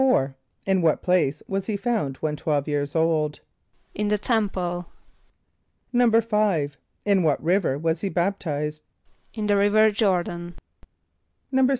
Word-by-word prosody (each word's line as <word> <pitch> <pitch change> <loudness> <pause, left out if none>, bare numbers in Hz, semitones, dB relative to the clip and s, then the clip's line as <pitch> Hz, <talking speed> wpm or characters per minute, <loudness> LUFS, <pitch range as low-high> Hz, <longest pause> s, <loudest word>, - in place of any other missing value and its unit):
= - - +4 0.6
In 190 -1 +2
what 160 -2 +2
place 175 -6 +1
was 195 0 -3
he 215 -2 -1
found 200 - -1
when 150 -1 -2
twelve 145 -1 -1
years 145 0 -2
old? 160 -2 +1 0.5
=In 210 0 -2
the 210 0 +2
temple.= 190 -6 -1 1.1
=5.= 215 -10 +2 0.3
In 200 -2 +3
what 155 -4 +1
river 170 -5 +2
was 160 +2 -1
he 200 - -1
baptized? 155 -5 -2 0.5
=In 215 -2 -2
the 205 -1 +3
river 215 +2 +4
Jôr´dan.= 175 -4 -1 1.0
=6. 265 0 +4
180 Hz, 130 wpm, -24 LUFS, 155-210 Hz, 1.1 s, =